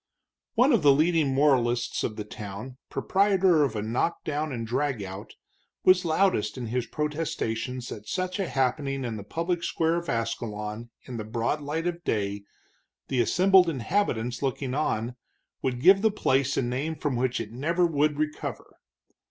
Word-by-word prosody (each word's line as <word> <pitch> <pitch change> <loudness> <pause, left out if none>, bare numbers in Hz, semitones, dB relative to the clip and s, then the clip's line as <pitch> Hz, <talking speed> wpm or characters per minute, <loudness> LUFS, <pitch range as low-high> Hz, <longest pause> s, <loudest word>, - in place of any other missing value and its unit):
One 255 +5 +5
of 225 - +4
the 145 -2 +7
leading 155 0 +3
moralists 125 -4 +2
of 110 - -2
the 105 - -4
town, 105 +4 -8
proprietor 190 -4 +3
of 140 - -1
a 105 - -2
knock 120 +10 -1
down 155 0 -2
and 115 -3 -3
drag 130 -1 -1
out, 95 +1 -8 0.5
was 185 0 +5
loudest 160 - +1
in 125 - -4
his 120 +1 -2
protestations 130 -6 -3
that 105 -1 -8
such 185 +1 -2
a 195 - -1
happening 135 0 0
in 115 -2 -3
the 105 - -6
public 170 - -2
square 165 +1 +1
of 170 0 -4
Ascalon, 115 -1 -3
in 125 -2 -7
the 110 - -4
broad 115 +7 -1
light 155 +3 -3
of 175 0 -3
day, 100 -4 -2 0.6
the 130 -3 +2
assembled 185 - +5
inhabitants 125 - -1
looking 135 -1 -2
on, 125 -4 -1 0.4
would 125 -2 -1
give 195 +8 +6
the 220 - +4
place 140 -9 +1
a - - +2
name 135 +7 -2
from 145 -3 -2
which 125 0 0
it 110 -2 -5
never 165 +9 +1
would 150 -2 +1
recover. 155 0 -4
135 Hz, 170 wpm, -27 LUFS, 115-165 Hz, 0.6 s, the